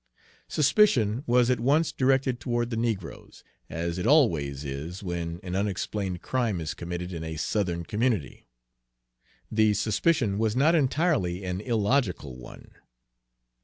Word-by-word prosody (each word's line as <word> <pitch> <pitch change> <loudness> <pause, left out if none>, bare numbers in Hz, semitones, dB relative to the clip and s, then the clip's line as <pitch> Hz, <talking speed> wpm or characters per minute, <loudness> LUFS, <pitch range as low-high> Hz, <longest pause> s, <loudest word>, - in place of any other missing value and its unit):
Suspicion 135 - +3
was 120 0 +4
at 125 - +1
once 145 +7 +2
directed 130 -1 +1
toward 120 -1 -2
the - - -1
negroes, 110 -6 -4 0.3
as 85 +2 -3
it 90 - -1
always 75 - +2
is 75 +8 -6
when 85 -2 -4
an 90 0 -4
unexplained 100 -1 -2
crime 120 -8 -1
is 80 -2 -3
committed 90 +1 -5
in 80 -1 -5
a 80 0 -5
Southern 85 +1 -1
community. 105 - -1 1.0
The 110 -1 +3
suspicion 110 - +1
was 110 0 +1
not 145 +6 +4
entirely 140 - +1
an 90 +1 -3
illogical 105 - 0
one. 60 - -12
105 Hz, 130 wpm, -27 LUFS, 85-125 Hz, 1.0 s, was